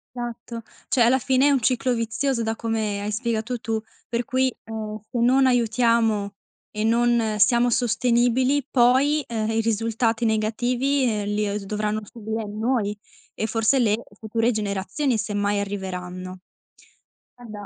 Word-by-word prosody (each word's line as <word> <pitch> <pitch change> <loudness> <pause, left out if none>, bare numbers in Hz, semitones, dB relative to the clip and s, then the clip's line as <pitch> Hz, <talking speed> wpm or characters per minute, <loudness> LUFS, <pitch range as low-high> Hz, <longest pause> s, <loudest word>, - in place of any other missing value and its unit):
Esatto, 240 -1 -6 0.3
cioè 255 - +2
alla 250 +3 +5
fine 265 +2 +3
è 290 - +4
un 270 - +2
ciclo 250 +1 +1
vizioso 235 +2 -1
da 225 0 -1
come 220 -3 -2
hai 210 - -3
spiegato 230 +1 -2
tu, 220 -1 -2 0.3
per 235 +1 -1
cui, 260 -1 +1
ehm, 215 -1 -6
se 240 - -3
non 260 +3 +4
aiutiamo 230 -4 +2 0.4
e 215 0 -3
non 230 -1 +2
siamo 240 +3 +4
sostenibili, 245 +3 +2
poi, 270 +4 +3
ehm, 220 -2 -2
i 225 - +1
risultati 225 +1 0
negativi, 245 +5 +1
ehm, 210 -2 -2
li, 210 +1 0
ehm, 205 +1 -2
dovranno 210 +1 -2
subire 220 +1 -5
noi 210 0 -1 0.4
e 220 - -2
forse 225 +4 +2
le 215 -3 +3 0.2
future 225 +2 0
generazioni, 215 +5 -1
semmai 205 0 -1
arriveranno. 185 -2 -5 1.0
Guarda, 215 -4 -9
225 Hz, 145 wpm, -24 LUFS, 215-245 Hz, 1.0 s, alla